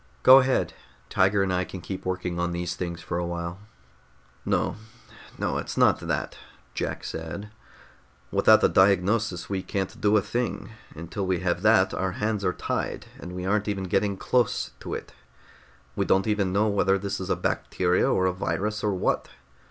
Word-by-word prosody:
"Go 130 +1 +10
ahead. 130 0 +1 0.4
Tiger 100 +1 +3
and 95 -1 0
I 90 0 +1
can 95 - -8
keep 95 +2 -7
working 90 -1 -2
on 85 0 -1
these 85 0 -2
things 85 -2 -5
for 85 - -2
a 85 - -1
while." 85 +1 -4 0.8
"No, - - 0 0.6
no, - - -1
it's - - -6
not - - +4
that," - - -3 0.3
Jack - - -3
said. 80 +6 -6 0.8
"Without - - +5
a - - +7
diagnosis, 100 0 +2
we 95 -2 -2
can't 95 0 -4
do 105 +1 +4
a - - +3
thing. 120 -1 -3 0.2
Until 85 +5 -4
we 90 -1 0
have 90 -1 0
that, 105 -2 +4
our 95 -1 -1
hands 105 0 -1
are 90 - +2
tied, - - -3
and 90 - -8
we 90 0 -5
aren't 105 +2 +1
even 100 -2 -2
getting 95 +2 0
close 125 +1 0
to - - -5
it. - - -8 0.8
We - - +1
don't 95 - +2
even 105 -4 +1
know 100 +3 +2
whether 100 -1 +2
this 100 +1 -3
is 95 - -5
a - - +2
bacteria, 90 0 +1
or 95 - +2
a 95 - +2
virus, 105 +3 -2
or 105 -2 +1
what. 90 - 0
95 Hz, 180 wpm, -26 LUFS, 90-105 Hz, 0.8 s, Go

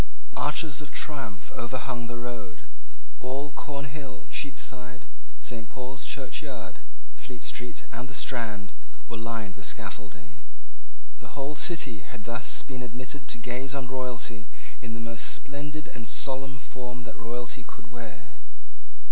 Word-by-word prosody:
Arches 150 0 +5
of 150 - -3
triumph 100 - 0
overhung 120 -1 +2
the 120 - +1
road. 115 -6 -2 0.6
All 135 +3 +2
Cornhill, 140 -1 -1
Cheapside, 130 -3 -1 0.4
Saint 115 -5 -1
Paul's 130 +1 -2
Church 135 -3 +1
Yard, - - -3 0.3
Fleet 125 -3 -5
Street, 125 0 -1
and 120 +2 0
the 135 - -4
Strand, 105 -6 +2 0.3
were 115 -2 -1
lined 115 -4 +1
with 100 -1 -3
scaffolding. 100 -5 -4 0.8
The - - -7
whole 140 +2 +3
city 145 - +3
had 115 +2 -6
thus 115 +4 +2
been 130 -2 -1
admitted 125 +2 -2
to - - +2
gaze 125 +3 +1
on 130 -2 0
royalty 120 -4 +1 0.3
in 115 -3 -1
the - - -1
most 115 -1 +1
splendid 150 +2 -1
and 115 -5 -2
solemn 135 +3 +5
form 125 -1 -3
that - - -3
royalty 120 +2 -1
could 115 -1 -9
wear. 115 -5 -5
125 Hz, 140 wpm, -34 LUFS, 115-135 Hz, 0.8 s, Arches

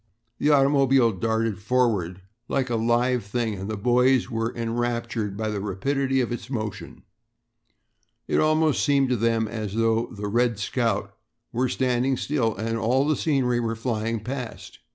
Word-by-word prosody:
The 150 - +2
automobile 135 -4 +4
darted 110 +1 -1
forward 105 -6 0 0.3
like 130 -2 -1
a - - +1
live 120 +2 +1
thing 110 +2 -2
and 95 +1 -6
the 110 - -3
boys 125 +4 +3
were 115 0 -1
enraptured 115 -3 -2
by 110 0 -2
the 105 -1 -2
rapidity 135 +7 0
of 120 - -2
its 120 0 -5
motion. 110 -5 -5 1.2
It - - +1
almost 155 -1 +2
seemed 140 -2 +3
to 125 - +2
them 115 0 +1
as 105 -2 -5
though 115 0 +1
the 105 0 -6
"Red 120 +1 +1
Scout" 115 +4 -1 0.4
were 125 +2 +1
standing 130 +1 +1
still 120 -7 0
and 115 +1 -2
all 130 +6 +2
the 155 - +2
scenery 130 -6 +1
were 115 -1 -1
flying 115 -1 -2
past. 115 -7 -6
115 Hz, 155 wpm, -25 LUFS, 110-130 Hz, 1.2 s, automobile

